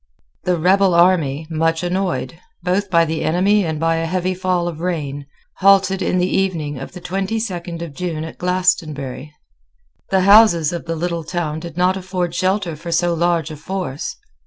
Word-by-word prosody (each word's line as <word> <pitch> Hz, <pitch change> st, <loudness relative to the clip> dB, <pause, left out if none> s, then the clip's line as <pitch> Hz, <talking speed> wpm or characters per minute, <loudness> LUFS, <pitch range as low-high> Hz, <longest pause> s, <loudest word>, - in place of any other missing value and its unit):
The 180 Hz, -1 st, +2 dB
rebel 185 Hz, +2 st, +3 dB
army, 165 Hz, -5 st, +3 dB
much 165 Hz, +1 st, 0 dB
annoyed, 180 Hz, -2 st, -2 dB, 0.2 s
both 190 Hz, +3 st, 0 dB
by 170 Hz, -2 st, +4 dB
the 160 Hz, 0 st, -3 dB
enemy 195 Hz, +5 st, +3 dB
and 160 Hz, -3 st, -2 dB
by 165 Hz, 0 st, +1 dB
a 165 Hz, 0 st, -1 dB
heavy 185 Hz, +1 st, -1 dB
fall 180 Hz, -1 st, -1 dB
of 165 Hz, -3 st, -5 dB
rain, 145 Hz, -5 st, -3 dB, 0.3 s
halted 195 Hz, 0 st, +4 dB
in 180 Hz, -, 0 dB
the 180 Hz, -, +2 dB
evening 165 Hz, -8 st, -1 dB
of 135 Hz, -, -8 dB
the 180 Hz, -, -8 dB
twenty 195 Hz, +5 st, -2 dB
second 175 Hz, -5 st, -4 dB
of 165 Hz, -4 st, -8 dB
June 160 Hz, -1 st, -3 dB
at 160 Hz, -, -9 dB
Glastonbury. 155 Hz, -7 st, -1 dB, 0.8 s
The 190 Hz, -1 st, +3 dB
houses 195 Hz, -5 st, +6 dB
of 170 Hz, -, -5 dB
the 165 Hz, 0 st, -3 dB
little 170 Hz, 0 st, -2 dB
town 160 Hz, -2 st, -3 dB
did 170 Hz, +1 st, -9 dB
not 180 Hz, +1 st, +2 dB
afford 180 Hz, -2 st, -3 dB
shelter 185 Hz, -3 st, 0 dB
for 170 Hz, +3 st, -7 dB
so 175 Hz, +1 st, +2 dB
large 170 Hz, -1 st, 0 dB
a -, -, -6 dB
force. 165 Hz, -2 st, -4 dB
175 Hz, 180 wpm, -19 LUFS, 160-185 Hz, 0.8 s, houses